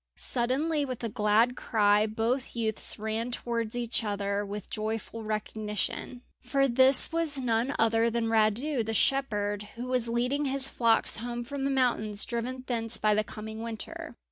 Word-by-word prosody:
Suddenly, 280 +6 0
with 255 -4 -5
a 230 - -1
glad 215 +4 +2
cry, 210 -2 +2
both 230 +5 -2
youths 220 -2 0
ran 220 +2 -2
towards 235 -2 -3
each 235 -1 0
other 200 -1 -1
with 205 -1 -6
joyful 220 +1 -4
recognition, 215 +3 -3 0.2
for 275 +2 +1
this 260 +1 +6
was 330 -3 +1
none 245 +1 0
other 225 +1 +3
than 235 0 -1
Radu, 225 +5 +1
the 220 +1 -2
shepherd, 210 -6 +1
who 240 +2 -5
was 250 -2 +1
leading 250 +5 0
his 270 0 -1
flocks 230 -3 +1
home 240 +1 -4
from 275 +2 -4
the - - +1
mountains, 235 -6 0
driven 250 +2 -4
thence 230 -2 0
by 215 -1 +2
the 215 +1 +2
coming 220 +1 -8
winter. 240 +7 -5
230 Hz, 160 wpm, -28 LUFS, 215-255 Hz, 0.2 s, this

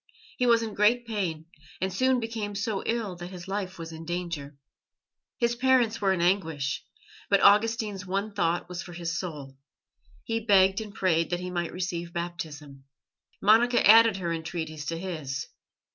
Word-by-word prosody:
He 250 - +1
was 230 -1 +4
in 220 -2 -4
great 235 +4 +3
pain, 185 -9 -3 0.3
and 190 0 -2
soon 255 +5 +2
became 225 -3 -4
so 205 -1 -2
ill 225 -5 -1
that 175 0 -7
his 180 0 -9
life 195 -1 -4
was 165 -1 -7
in 160 0 -8
danger. 165 -5 -5 0.8
His 235 0 +1
parents 245 -3 +2
were 195 -1 +3
in 185 -3 0
anguish, 165 -6 0 0.5
but 200 - +5
Augustine's 210 -1 +3
one 195 +3 -2
thought 175 -3 0
was 180 0 -5
for 175 - -10
his 165 -1 -3
soul; 145 -7 -7 0.7
he 225 0 -1
begged 195 -2 +4
and 215 -2 -7
prayed 165 -5 +1
that 175 - -1
he 180 0 -5
might 175 -1 -2
receive 175 -2 -4
Baptism. 155 -5 -6 0.6
Monica 230 +3 +5
added 225 -1 +7
her 170 -3 -2
entreaties 160 -2 -5
to 165 - -2
his. 155 -7 -5
185 Hz, 165 wpm, -27 LUFS, 165-215 Hz, 0.8 s, added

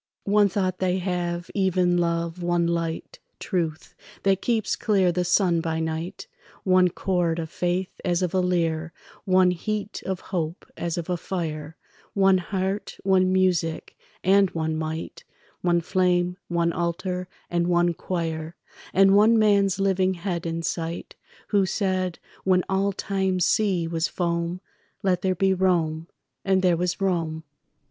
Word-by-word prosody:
One 205 0 +4
thought 185 -1 -1
they 185 0 +1
have, 175 -2 -2
even 185 -2 +2
love; 170 0 -1
one 175 0 +1
light, 170 - -3 0.2
Truth, 165 -4 -3 0.3
that 195 -1 +2
keeps 230 -3 0
clear 195 -4 +2
the 180 +1 0
sun 175 -1 +2
by 160 -1 -2
night; 160 +2 -4 0.4
One 185 -1 +5
chord, 175 -2 0
of 160 -2 -4
faith 180 +1 -2
as 180 -1 +1
of 180 - -1
a 190 - +2
lyre; 165 -3 0 0.3
One 185 -2 +4
heat, 210 +4 -3
of 190 -2 -2
hope 165 -1 -2
as 170 -1 -3
of 170 - -3
a 180 -1 -1
fire; 160 -4 -4 0.4
One 195 -1 +5
heart, 190 +2 -3
one 185 -1 +3
music, 180 -3 0 0.3
and 195 0 +5
one 160 -1 -1
might, 160 +1 -5 0.4
One 175 -1 +2
flame, 180 0 +1
one 170 -1 +1
altar, 180 +1 -2 0.2
and 170 0 +1
one 175 0 +3
choir; 165 -2 -4 0.4
And 195 +1 +6
one 220 +3 +6
man's 200 -3 +3
living 190 -1 +2
head 175 -1 -3
in 165 0 -3
sight 165 0 -3 0.4
Who 200 -2 +3
said, 185 -2 -1 0.3
when 185 -1 +3
all 195 +1 +1
time's 190 -2 0
sea 190 -6 +1
was 165 0 0
foam, 170 0 -2 0.4
"Let 180 -2 +2
there 185 0 +1
be 190 +1 +2
Rome"—and 180 +1 -1
there 180 -2 +4
was 175 +1 -1
Rome. 165 -5 -1
180 Hz, 145 wpm, -25 LUFS, 170-190 Hz, 0.4 s, And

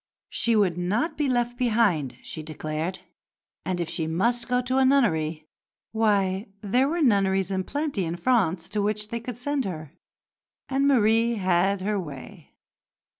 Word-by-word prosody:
She 235 -1 +2
would 185 -5 +2
not 210 - 0
be 295 -3 0
left 245 0 0
behind, 215 - +1
she 160 - -6
declared; 155 +3 -4 0.6
and 185 -1 -2
if 170 - -1
she 160 0 -2
must 235 +9 0
go 250 -1 +2
to 255 +1 0
a - - +5
nunnery, 160 - +2 0.5
why 200 -3 +1
there 245 +6 +2
were 335 +1 0
nunneries 195 -5 +2
in 190 -1 -1
plenty 285 - -2
in 165 +1 -3
France 180 -5 +1
to 210 -1 -1
which 210 +1 -1
they 235 - -3
could 235 0 -7
send 285 +2 -1
her. 155 -6 -6 0.8
And 275 +1 +1
Marie 230 -2 +3
had 190 0 +1
her 205 +1 -1
way. 155 +1 -10
205 Hz, 160 wpm, -25 LUFS, 175-245 Hz, 0.8 s, a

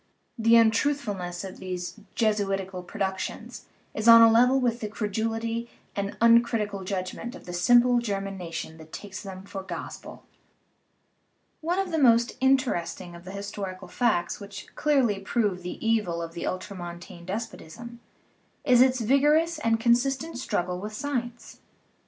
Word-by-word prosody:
The 230 -1 +4
untruthfulness 220 -6 +1
of 190 -1 -8
these 185 +2 -5 0.2
Jesu 215 -3 +1
itical 190 -1 -3
productions 190 -3 -4 0.3
is 215 +1 -2
on 230 0 +10
a 225 - +7
level 250 +4 +5
with 240 -2 0
the 215 - -3
credulity 225 +2 -2 0.3
and 200 0 -1
the - - -11
uncritical 230 -4 +3
judgment 190 +6 -4
of - - -13
the 175 - -7
simple 240 +7 +5
German 195 -4 -3
nation 165 -3 -6
that 160 0 -13
takes 200 -2 -7
them 190 -1 -8
for 195 0 -7
gospel. 190 - -8 1.4
One 340 +3 -1
of 385 -2 -1
the 320 - 0
most 235 -3 +4
interesting 260 -10 0
of 170 0 -12
the 185 - -7
historical 195 -2 -6
facts 215 -3 0
which 200 -1 -10
clearly 265 -9 +2
prove 195 -2 -1
the 180 - -6
evil 210 -7 +1
of 165 0 -7
the 170 - -5
ultramontane 175 -1 -7
des 190 - -1
potism 235 +5 -11 0.7
is 250 -2 +6
its 255 -1 +4
vigorous 300 +7 +3
and 225 -5 +1
consistent 255 +5 +1
struggle 180 -7 -2
with 210 +3 -6
sci 285 +7 -4
ence. 240 -1 -5
215 Hz, 150 wpm, -26 LUFS, 190-240 Hz, 1.4 s, on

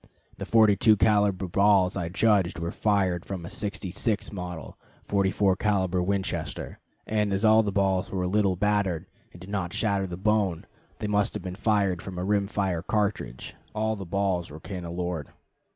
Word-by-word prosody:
The - - -5
42 110 -1 +5
caliber 100 -3 +2
balls 100 0 +3
I 90 -4 -2
judged 100 -1 +2
were 85 0 -3
fired 95 -5 +1
from 95 -4 -6
a - - -7
'66 100 +1 -2
model, 90 -4 -7 0.3
44 100 -1 +2
caliber 95 -4 +1
Winchester, 95 +1 -3 0.3
and 105 -1 0
as 100 +3 +1
all 110 +1 +6
the 105 -2 -2
balls 95 -1 +1
were 95 -1 -1
little 95 0 +2
battered 100 -3 0 0.3
and 85 - -14
did 90 +3 -10
not 90 -4 -2
shatter 100 -3 0
the 85 -1 -6
bone, 100 -4 +1 0.3
they 105 - -4
must 105 0 +1
have 105 - -4
been 90 -1 -5
fired 100 -3 +1
from 95 -2 -8
a 90 - -2
rim 100 0 +1
fire 95 -5 -1
cartridge; 105 - -2 0.2
all 110 +1 0
the 100 - -6
balls 95 -1 -1
were 75 - -10
cannelured. 85 -3 -4
95 Hz, 170 wpm, -27 LUFS, 90-105 Hz, 0.3 s, all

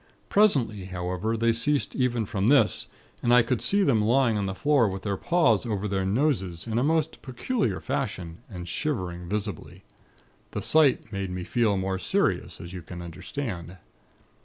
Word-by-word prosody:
Presently, 125 - +2
however, 90 +4 -2
they 115 +1 +2
ceased 140 +5 +1
even 120 -3 0
from 100 +1 -1
this, 140 +2 +4 0.3
and 120 - +1
I 125 0 +7
could 120 0 -1
see 200 0 +3
them 120 - +3
lying 120 +1 +3
on 100 -2 -1
the 95 - -4
floor 140 -3 +3
with 95 0 -6
their 100 -2 -1
paws 140 - +2
over 105 -4 -2
their 95 -1 -1
noses, 95 - 0
in 115 0 -1
a - - +1
most 160 +1 0
peculiar 130 - -2
fashion, 85 -2 -4
and 90 -4 -7
shivering 90 - -3
visibly. 105 -3 -5 0.7
The - - -3
sight 150 -8 +3
made 100 -1 -3
me 90 0 -4
feel 110 -1 +1
more 95 0 -2
serious, - - 0
as 85 +1 -9
you 90 - -6
can 85 +2 -9
understand. 90 - -6
105 Hz, 170 wpm, -26 LUFS, 95-130 Hz, 0.7 s, I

